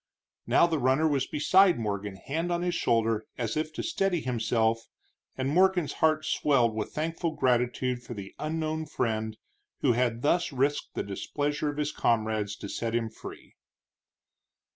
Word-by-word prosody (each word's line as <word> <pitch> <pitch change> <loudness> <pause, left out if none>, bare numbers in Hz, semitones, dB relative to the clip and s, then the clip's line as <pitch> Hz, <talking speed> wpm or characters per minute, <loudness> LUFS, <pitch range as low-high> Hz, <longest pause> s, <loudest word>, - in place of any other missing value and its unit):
Now - - +5
the 165 -3 0
runner 135 +5 +3
was 140 -4 0
beside 185 +5 +4
Morgan, 100 -3 -3
hand 160 - -3
on 175 0 0
his 180 0 0
shoulder 115 -7 +1
as 115 -3 -2
if 155 0 -1
to - - -4
steady 195 - 0
himself, 115 -2 0 0.5
and 130 0 -1
Morgan's 180 0 +3
heart 155 -1 +3
swelled 135 -6 +2
with 110 -1 -3
thankful 165 +1 -2
gratitude 125 -1 +1
for 120 - -8
the 100 -2 -8
unknown 155 0 -2
friend 110 -5 -2 0.4
who - - +4
had 120 -1 0
thus 170 +3 +2
risked 140 +2 -1
the - - -1
displeasure 145 +9 -2
of 145 - -5
his 150 0 -1
comrades 110 -5 0
to 100 - -8
set 115 +3 -3
him 115 -2 -1
free. - - -11
130 Hz, 160 wpm, -28 LUFS, 115-155 Hz, 0.5 s, Now